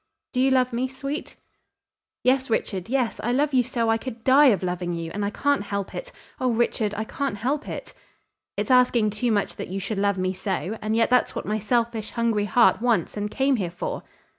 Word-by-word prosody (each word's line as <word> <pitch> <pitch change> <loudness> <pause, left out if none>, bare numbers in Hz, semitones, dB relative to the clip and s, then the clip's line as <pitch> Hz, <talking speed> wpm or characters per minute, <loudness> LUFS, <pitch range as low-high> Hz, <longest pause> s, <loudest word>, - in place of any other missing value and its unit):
"Do 250 - 0
you 265 +1 +4
love 255 -2 +2
me, 250 +2 0
sweet?" 275 +3 -5 0.9
"Yes, 260 +1 +2
Richard, 195 -3 -1
yes. 250 -3 0
I 240 - 0
love 285 +3 +1
you 255 - +5
so 235 -2 0
I 225 - +2
could 230 -2 -7
die 275 +4 +6
of 205 -7 +3
loving 180 -1 -2
you, 165 -1 -5
and 205 - -2
I 200 - 0
can't 285 +5 +1
help 200 -1 -4
it. - - -6 0.3
Oh, 255 - +1
Richard, 225 -3 0
I 220 - -1
can't 245 -1 -3
help 280 +7 -2
it." - - -7 0.6
"It's - - -1
asking 245 -4 +4
too 225 +3 -1
much 205 -2 0
that - - -5
you 190 +2 -4
should 200 +1 -3
love 200 -1 +1
me 185 0 0
so, 190 0 -3
and 215 +1 -1
yet 230 +1 +2
that's 250 - +3
what - - -4
my 215 +1 -1
selfish, 230 0 0
hungry 230 -3 0
heart 230 +3 +4
wants 230 -8 +1
and 210 0 -2
came 270 +3 +1
here 185 -5 -2
for." - - -4
230 Hz, 215 wpm, -24 LUFS, 205-255 Hz, 0.9 s, die